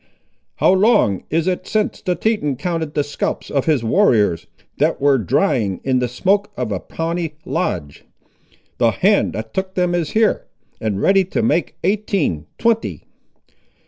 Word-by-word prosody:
"How - - +4
long 190 - +3
is 165 +1 0
it 185 -1 -2
since 215 -1 -1
the 180 -3 -1
Teton 175 -7 0
counted 160 +1 -3
the 145 - +2
scalps 145 - -4
of 140 -2 0
his 150 -7 +2
warriors, 110 - +2 0.3
that 155 +3 +1
were 140 -1 +3
drying 105 - +1
in 130 -1 +1
the 125 - 0
smoke 195 - 0
of 120 -3 -2
a 95 - -1
Pawnee 165 - -4
lodge? 75 -5 -3 0.8
The - - +4
hand - - +2
that 110 0 -6
took 190 0 -3
them 180 -1 +1
is 170 -3 -1
here, 220 0 +2 0.3
and 105 -3 -2
ready 195 - +4
to 225 +5 -2
make 170 -7 0
eighteen, 190 - 0
twenty." 230 -1 0
160 Hz, 155 wpm, -19 LUFS, 120-190 Hz, 0.8 s, How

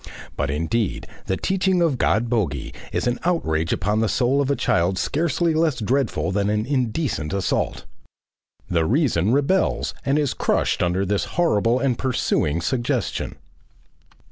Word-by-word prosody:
But 70 0 -1
indeed, 85 +9 -1 0.2
the 95 - 0
teaching 190 -1 +1
of 145 -7 +1
God 110 +5 +2
Bogey 90 - -1 0.2
is - - -1
an 120 0 0
outrage 85 - 0
upon 105 +2 0
the 110 -1 +1
soul 130 +3 +2
of 140 - -1
a 140 - +2
child 90 -3 +1
scarcely 165 - 0
less 155 -4 +1
dreadful 125 -2 0
than 100 +1 0
an 105 +1 0
indecent 125 - -1
assault. 100 -1 -1 0.8
The 85 -2 +1
reason 110 - +2
rebels 145 +8 +1
and 140 +2 +1
is 145 -5 +1
crushed - - 0
under 90 +2 +1
this 100 +1 0
horrible 120 -9 +3
and 130 -3 0
pursuing 85 - 0
suggestion. 125 - -2
120 Hz, 145 wpm, -22 LUFS, 95-140 Hz, 0.8 s, horrible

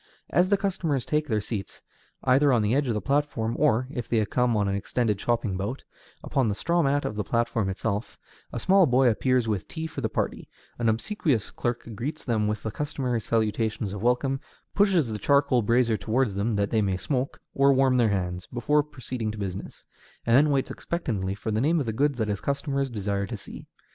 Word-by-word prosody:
As 180 +4 +3
the 200 - +4
customers 170 - -1
take 150 0 0
their 110 -5 +1
seats, 100 -2 -6 0.4
either 135 +2 +4
on 120 -4 +3
the 105 +2 +1
edge 140 +1 +2
of 115 - 0
the 105 - -1
platform, 135 -5 0
or, 130 -4 +3
if 120 -6 -5
they 115 - +2
have 105 -2 0
come 125 -3 +2
on 100 -1 +1
an 100 - 0
extended 105 +1 -1
shopping 115 -5 0
bout, 105 +8 -4 0.4
upon 130 -5 +1
the 100 - -1
straw 170 +9 +1
mat 145 -1 +1
of 105 - -3
the 105 - -1
platform 115 -3 0
itself, 100 +2 -3 0.3
a - - -4
small 190 - +5
boy 130 0 +4
appears 125 +1 +1
with 105 -4 -2
tea 160 -1 -5
for 155 -3 -5
the 110 - -1
party; - - -3 0.3
an 115 -1 +2
obsequious 120 - 0
clerk 120 -1 -3
greets 140 +9 -5
them 110 -4 +1
with 105 0 -2
the 110 - -3
customary 125 -2 -2
salutations 110 -2 -1
of 100 - -5
welcome, 125 +3 +1 0.3
pushes 185 - +3
the 105 - -4
charcoal 140 +1 +3
brazier 115 0 +2
toward 125 +4 +1
them, 100 +3 -1
that 100 0 0
they 110 -2 +3
may 95 -2 0
smoke, 130 +5 -2
or 140 0 +4
warm 130 -1 +3
their 120 -3 +4
hands, 90 -2 -2
before 140 +5 +2
proceeding 130 -6 -5
to 110 - -5
business, 95 -2 -6 0.4
and 115 - +4
then 145 +3 +5
waits 135 -2 0
expectantly 105 - -3
for 105 +2 -4
the 110 +1 +1
name 160 +5 +3
of 140 - -1
the 110 - -2
goods 140 +3 +1
that 110 -3 0
his 100 -2 -2
customers 140 -1 -1
desire 100 -3 -2
to 115 - -5
see. 100 - -10
120 Hz, 215 wpm, -26 LUFS, 105-140 Hz, 0.4 s, small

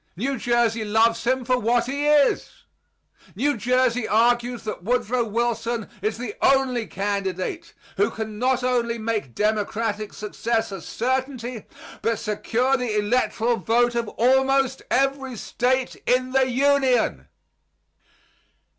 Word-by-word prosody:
New 265 +6 -2
Jersey 235 -2 +1
loves 225 +2 +2
him 260 0 +1
for 250 0 +2
what 235 +1 +2
he 285 +3 -2
is. 295 -2 +2 0.7
New 290 +2 +1
Jersey 250 0 +1
argues 240 +2 +2
that 215 -4 -5
Woodrow 245 +2 0
Wilson 230 0 -2
is 215 +2 -1
the 235 -3 -5
only 260 -4 +2
candidate 200 - -3 0.2
who 200 - +3
can 220 -1 -6
not 255 0 +1
only 240 -2 0
make 215 - -3
Democratic 215 0 -1
success 225 +1 -2
a 195 -3 -6
certainty, 255 - -3 0.3
but 230 -1 0
secure 235 +5 0
the 240 -4 -2
electoral 235 +2 +1
vote 240 +4 +2
of 235 -1 -1
almost 265 +2 +2
every 270 -1 0
State 255 +3 -1
in 255 +1 +2
the 260 0 +2
Union. 265 -2 +2
240 Hz, 125 wpm, -23 LUFS, 220-255 Hz, 0.7 s, who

